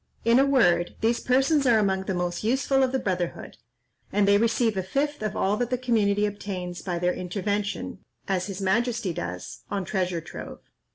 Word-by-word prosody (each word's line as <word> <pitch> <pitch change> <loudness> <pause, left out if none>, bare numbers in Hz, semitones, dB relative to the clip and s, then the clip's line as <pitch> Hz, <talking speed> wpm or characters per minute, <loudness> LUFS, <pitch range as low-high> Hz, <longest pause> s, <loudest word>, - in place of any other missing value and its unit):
In 230 +2 +5
a 270 - +5
word, 175 -11 +3
these 230 +2 +2
persons 270 +3 +2
are 235 -2 +5
among 190 -2 +1
the 190 - -2
most 175 +1 -2
useful 265 +4 +2
of 260 -1 +2
the 265 - +1
brotherhood: 185 -7 -3 0.5
and 205 -1 +2
they 200 0 +5
receive 230 -1 +2
a 190 - 0
fifth 280 +10 -2
of 215 -1 -2
all 200 +2 +1
that 245 0 -1
the 250 - 0
community 210 -5 +2
obtains 185 -4 -5
by 180 -3 -3
their 180 +1 +1
intervention, 200 +3 -3 0.3
as 185 -1 0
his 195 -1 -5
majesty 225 0 0
does, 90 - -6
on 195 -2 -2
treasure 180 -3 -1
trove. 165 - -9
205 Hz, 185 wpm, -26 LUFS, 185-240 Hz, 0.5 s, In